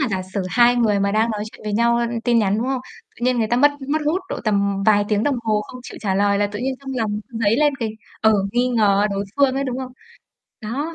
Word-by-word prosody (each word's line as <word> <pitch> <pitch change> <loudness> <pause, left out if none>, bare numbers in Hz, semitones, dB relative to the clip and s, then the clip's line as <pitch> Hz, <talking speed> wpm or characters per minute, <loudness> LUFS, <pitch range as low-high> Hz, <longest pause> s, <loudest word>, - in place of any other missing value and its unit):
mà 275 - +1
giả 190 -3 -2
sử 190 +1 -4
hai 240 +4 +4
người 215 -4 +2
mà 200 0 +1
đang 220 +2 +2
nói 210 -1 -3
chuyện - - -15
với 210 - -3
nhau, 235 +2 +3
ơ, 235 - +1 0.2
tin 240 -1 +3
nhắn, 205 -1 +1
đúng 235 - -1
không? 265 -1 -1 0.4
Tự 240 - -5
nhiên 250 -1 +2
người 225 - +1
ta 240 - +1
mất 290 +4 +5 0.2
mất 305 +2 +1
hút 335 +5 +1
độ - - -4
tầm 200 -2 +1
vài 205 -1 +4
tiếng 210 -1 +1
đồng 285 0 +1
hồ 215 -1 +1
không 250 +4 -10
chịu - - -10
trả 195 -3 -1
lời 200 +1 +2
là 205 - +2
tự 205 0 -7
nhiên 260 +3 -2
trong 275 -1 -7
lòng 210 -3 -1
dấy 225 -2 +1
lên 295 0 +3
cái 230 -3 -2 0.3
ờ, 220 0 +4 0.2
nghi 245 +1 +2
ngờ 210 -4 +3
đối 200 0 -2
phương 275 -2 +3
ấy, 275 +1 -1
đúng 255 -1 -3
không? 255 -1 -6 0.7
Đó, 280 +10 -4
225 Hz, 275 wpm, -21 LUFS, 205-255 Hz, 0.7 s, mất